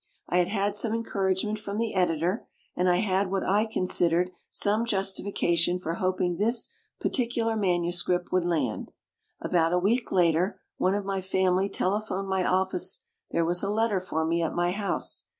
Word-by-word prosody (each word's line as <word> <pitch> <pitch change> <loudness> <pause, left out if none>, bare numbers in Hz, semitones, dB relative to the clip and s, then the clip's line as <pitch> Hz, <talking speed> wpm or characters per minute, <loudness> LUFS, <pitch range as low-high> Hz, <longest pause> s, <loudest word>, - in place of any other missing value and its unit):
I 180 - +2
had 175 - +2
had 200 +1 -1
some 220 +1 +1
encouragement 205 -1 -1
from 205 -1 -5
the 225 0 -1
editor, 180 +2 0 0.3
and 180 +1 +2
I 175 - +4
had 190 0 +1
what 195 0 -1
I 210 +3 +2
considered 180 -3 +1 0.2
some 210 +3 +1
Justification 190 -5 +1
for 165 -2 -4
hoping 185 -1 -1
this 225 +3 +1 0.3
particular 235 -3 0
manuscript 175 -2 0
would 185 -1 +2
land. 155 -10 -1 0.5
About 165 -1 +1
a - - +3
week 225 +7 +1
later, 175 +2 +2 0.2
one 185 +2 +2
of 205 -1 -2
my 195 -1 -2
family 190 +1 +1
tele 200 +3 0
phoned 195 -2 -4
my 190 -1 0
office 185 0 0 0.3
there 165 0 +1
was 175 +2 +2
a 200 - -1
letter 215 -1 +1
for 160 -3 -2
me 170 +1 +1
at 165 - -2
my 175 0 +1
house. 200 +1 -2
185 Hz, 170 wpm, -27 LUFS, 175-205 Hz, 0.5 s, I